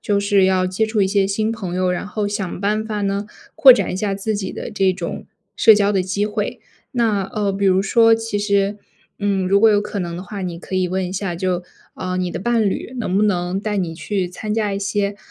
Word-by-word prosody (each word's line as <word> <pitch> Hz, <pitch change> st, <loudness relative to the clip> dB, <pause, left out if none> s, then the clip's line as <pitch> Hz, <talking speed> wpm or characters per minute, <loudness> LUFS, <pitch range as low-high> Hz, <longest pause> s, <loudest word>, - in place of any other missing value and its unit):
就 200 Hz, -1 st, 0 dB
是 200 Hz, -1 st, +3 dB
要 185 Hz, -1 st, +2 dB
接 190 Hz, +4 st, 0 dB
触 220 Hz, -2 st, +1 dB
一 190 Hz, -, +2 dB
些 195 Hz, 0 st, +2 dB
新 215 Hz, +3 st, -1 dB
朋 195 Hz, -6 st, -5 dB
友， 185 Hz, 0 st, +1 dB
然 180 Hz, +2 st, -3 dB
后 205 Hz, 0 st, -2 dB
想 195 Hz, -3 st, -4 dB
办 210 Hz, +2 st, 0 dB
法 210 Hz, -1 st, -3 dB
呢， 200 Hz, 0 st, -1 dB, 0.3 s
扩 265 Hz, -, +9 dB
展 200 Hz, -8 st, 0 dB
一 -, -, -3 dB
下 200 Hz, 0 st, -1 dB
自 205 Hz, +2 st, -2 dB
己 190 Hz, -2 st, -4 dB
的 -, -, -6 dB
这 195 Hz, -2 st, +2 dB
种 180 Hz, -2 st, -6 dB, 0.3 s
社 220 Hz, -, +7 dB
交 205 Hz, -1 st, +2 dB
的 195 Hz, -2 st, +1 dB
机 200 Hz, +2 st, -1 dB
会。 210 Hz, 0 st, -3 dB, 0.3 s
那 220 Hz, -5 st, +1 dB
呃， 200 Hz, 0 st, -2 dB
比 195 Hz, +1 st, 0 dB
如 190 Hz, 0 st, +4 dB
说 225 Hz, +3 st, +5 dB
其 225 Hz, -2 st, -3 dB
实， 200 Hz, 0 st, +1 dB, 0.4 s
嗯， 195 Hz, -2 st, 0 dB
如 200 Hz, -, +4 dB
果 225 Hz, +2 st, +6 dB
有 205 Hz, -1 st, +3 dB
可 205 Hz, 0 st, -5 dB
能 170 Hz, -2 st, -4 dB
的 180 Hz, -, -6 dB
话， 195 Hz, +2 st, -7 dB
你 175 Hz, -2 st, -4 dB
可 185 Hz, +2 st, -5 dB
以 185 Hz, -1 st, +1 dB
问 185 Hz, +1 st, -1 dB
一 185 Hz, -, -6 dB
下， 195 Hz, -2 st, -3 dB
就， 180 Hz, 0 st, -2 dB, 0.3 s
啊， 185 Hz, 0 st, -4 dB
你 180 Hz, -1 st, -1 dB
的 -, -, -4 dB
伴 230 Hz, +3 st, +1 dB
侣 245 Hz, -, -5 dB
能 190 Hz, -4 st, -1 dB
不 210 Hz, -, +3 dB
能 180 Hz, -2 st, 0 dB
带 210 Hz, 0 st, -2 dB
你 175 Hz, -4 st, -1 dB
去 180 Hz, +3 st, -3 dB
参 210 Hz, +4 st, -4 dB
加 210 Hz, -3 st, 0 dB
一 195 Hz, -, -2 dB
些， 200 Hz, 0 st, -1 dB
200 Hz, 265 characters per minute, -20 LUFS, 185-210 Hz, 0.4 s, 扩